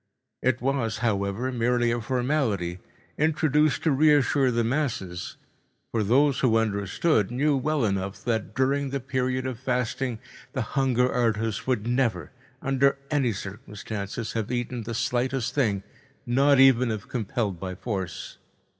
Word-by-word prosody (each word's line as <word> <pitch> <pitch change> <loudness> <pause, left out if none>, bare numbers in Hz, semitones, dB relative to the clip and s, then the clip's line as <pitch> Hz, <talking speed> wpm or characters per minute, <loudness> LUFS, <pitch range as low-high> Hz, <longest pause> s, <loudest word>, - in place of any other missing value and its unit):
It 125 -2 +1
was, 125 -5 0
however, 100 +3 0
merely 120 0 +1
a 120 0 -1
formality, 120 - -1 0.4
introduced 150 -1 +2
to 160 - +3
reassure 145 -2 +4
the 120 -1 +1
masses, 115 -9 -2 0.5
for 115 - 0
those 135 +6 +3
who 115 -4 +3
understood 105 - +1
knew 140 +4 +1
well 145 -1 0
enough 100 -1 -2
that 110 -2 -2
during 135 +2 +1
the 140 +1 -2
period 130 -1 -1
of 130 -3 -4
fasting 125 -1 -1 0.4
the 130 -4 -1
hunger 125 -2 +2
artist 115 -2 0
would 125 -5 0
never, 120 -1 0 0.3
under 135 +1 +2
any 135 -5 +2
circumstances, 105 +1 -6
have 110 0 -2
eaten 120 0 -2
the 115 +1 -5
slightest 125 +1 -1
thing, 105 -9 +1 0.4
not 135 +3 +4
even 130 -2 +6
if 110 -2 -4
compelled 110 -5 -2
by 95 0 -5
force. 95 -5 -5
125 Hz, 135 wpm, -26 LUFS, 110-135 Hz, 0.5 s, even